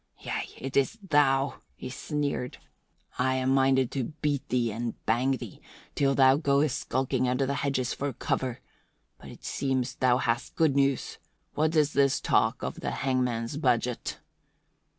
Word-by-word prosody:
"Yea, - - -4
it 135 +1 -6
is 140 +11 +2
thou," 140 -3 +2
he - - -7
sneered. 140 -1 -3 0.6
"I 130 +1 +2
am 130 0 +1
minded 135 -2 +3
to 135 -3 -1
beat 145 -2 -1
thee 120 -2 +1
and 115 +2 -3
bang 125 +4 +2
thee 120 -6 -10 0.3
till 135 -1 +2
thou 130 0 +6
goest 145 -2 +2
skulking 130 0 0
under 125 +2 +1
the 140 - -1
hedges 135 -3 -1
for 140 0 -2
cover. 125 +1 -2 0.6
But - - -11
it - - -13
seems 130 -2 -1
thou 125 -2 +3
hast 120 -2 -1
good 155 -4 +3
news. 140 -1 +1 0.3
What 155 +2 +1
is 150 -1 +3
this 140 -1 +3
talk - - +1
of - - -4
the - - -3 0.2
hangman's 125 -1 0
budget?" 125 -4 0
130 Hz, 155 wpm, -28 LUFS, 125-140 Hz, 0.6 s, thou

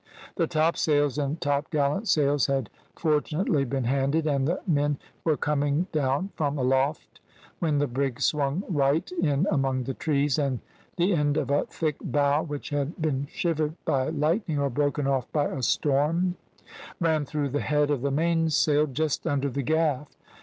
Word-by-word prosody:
The 165 -4 +1
topsails 150 -3 +1
and 145 +3 -2
topgallant 145 +6 0
sails 145 -5 +3
had 135 -5 -1 0.2
fortunately 150 -1 +1
been 135 0 -2
handed, 140 +5 +1
and 140 -3 +1
the 175 - 0
men 145 -4 +1 0.3
were 155 -3 +2
coming 145 +2 0
down 145 +6 0
from 145 -1 -1
aloft 135 +3 0 0.4
when 155 -4 +1
the 145 - +2
brig 135 -1 -2
swung 150 +4 0
right 150 0 +1
in 170 -3 +1
among 135 -3 +1
the 135 +2 -3
trees, 145 0 0
and 135 -4 0 0.4
the 180 +3 +2
end 150 -2 +1
of 145 -2 -1
a 145 - +2
thick 155 -3 -2
bough 145 0 +2
which 145 -2 -6
had 145 +4 -2
been 145 -3 -1
shivered 160 -2 -1
by 130 -1 +1
lightning, 160 +2 0
or 140 -1 0
broken 145 +2 0
off 135 -3 0
by 145 -2 +1
a 135 - -3
storm, 150 +8 +1 0.7
ran 160 -3 +2
through 145 0 -2
the 145 +2 -1
head 150 0 +1
of 140 -4 0
the 140 - 0
mainsail 155 -1 +2
just 150 +3 -2
under 140 -2 0
the 140 - -2
gaff. 150 0 0
145 Hz, 165 wpm, -26 LUFS, 140-155 Hz, 0.7 s, sails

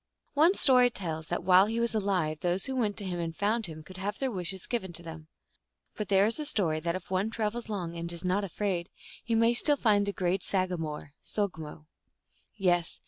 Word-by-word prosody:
One 320 +7 +4
story 250 -6 +6
tells 160 -8 -5
that 175 - -3
while 185 +2 +6
he 225 +2 -2
was 235 0 +2
alive 185 -8 0
those 180 +3 0
who 265 - -3
went 215 -5 0
to 205 - -5
him 180 -2 -3
and 165 -1 -3
found 215 +3 0
him 155 -1 -9
could 185 +4 -12
have 205 +2 -3
their 265 -2 -1
wishes 185 -2 -5
given 220 -7 -3
to 170 - +4
them. 160 -1 -9 0.7
But 210 - -5
there 195 0 +5
is 230 +7 0
a 305 - -2
story 175 - +1
that 170 +2 -2
if 185 0 -8
one 190 +3 +1
travels 225 +1 -3
long, 175 -5 -4
and 170 0 -3
is 170 +1 -7
not 185 +3 +1
afraid, 190 -2 -2 0.3
he 230 - -1
may 230 +1 +4
still 290 +4 +4
find 205 -5 +2
the - - 0
great 185 -1 -1
sagamore 165 -7 -2
(so^mo). 160 -7 -4 0.7
Yes. 175 -4 +1
190 Hz, 210 wpm, -29 LUFS, 170-220 Hz, 0.7 s, story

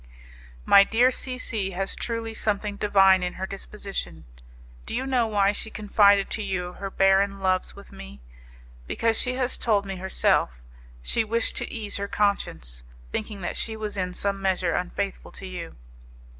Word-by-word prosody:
My 200 - +8
dear 240 +5 +3
C 255 0 -3
C 220 -6 -1
has 195 0 -2
truly 230 -1 -3
something 210 -1 -1
divine 195 -2 +5
in 180 0 -2
her 190 - -4
disposition. 195 - -5 0.6
Do - - -3
you 260 - -1
know 255 -4 +2
why 200 -2 +3
she 215 +1 -3
confided 205 -2 +4
to 220 - -1
you 180 -3 -3
her 195 +1 -6
barren 195 +1 +3
loves 185 -1 0
with 200 - -13
me? 65 +1 -11 0.7
Because, 230 - +1
as 255 0 0
she - - -4
told 205 -4 +2
me 195 -1 -5
herself, 180 - +1 0.4
she 225 - +1
wished 230 +1 -1
to - - -3
ease 215 -3 -2
her 200 0 -3
conscience, 60 - -1 0.3
thinking 210 -2 -4
that 175 - -3
she 220 -1 -3
was 215 -1 -4
in 180 -2 -2
some 200 0 -2
measure 185 -3 +1
unfaithful 180 +2 -3
to 195 - -9
you." 180 -3 -7
200 Hz, 170 wpm, -25 LUFS, 190-220 Hz, 0.7 s, My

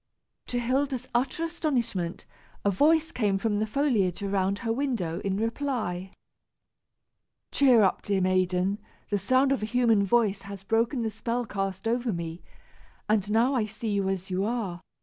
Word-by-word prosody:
To 245 - -2
Hilda's 255 +1 0
utter 255 +7 0
astonishment, 245 - -2 0.4
a 200 - +4
voice 320 - +3
came 205 -8 +1
from 205 +1 0
the 215 - 0
foliage 215 - +1
around 195 0 0
her 225 -1 -1
window, 230 -11 -1
in 195 -1 -2
reply. 225 -6 -2 1.4
"Cheer 255 -6 +5
up, 190 - +2
dear 200 -1 0
maiden; 185 +1 +1 0.3
the 205 - +2
sound 260 +7 +3
of 275 - +1
a 215 - -2
human 230 -3 +3
voice 205 -1 +2
has 200 -1 -9
broken 230 +4 +1
the 220 - -1
spell 235 +3 -2
cast 195 -1 -3
over 240 +1 0
me, 170 -1 -5 0.7
and 215 -2 +3
I - - -8
now 235 +1 +3
see 220 +1 -4
you 200 -1 0
as 190 0 -3
you 185 +1 0
are. 205 -6 -2
215 Hz, 160 wpm, -27 LUFS, 195-245 Hz, 1.4 s, Cheer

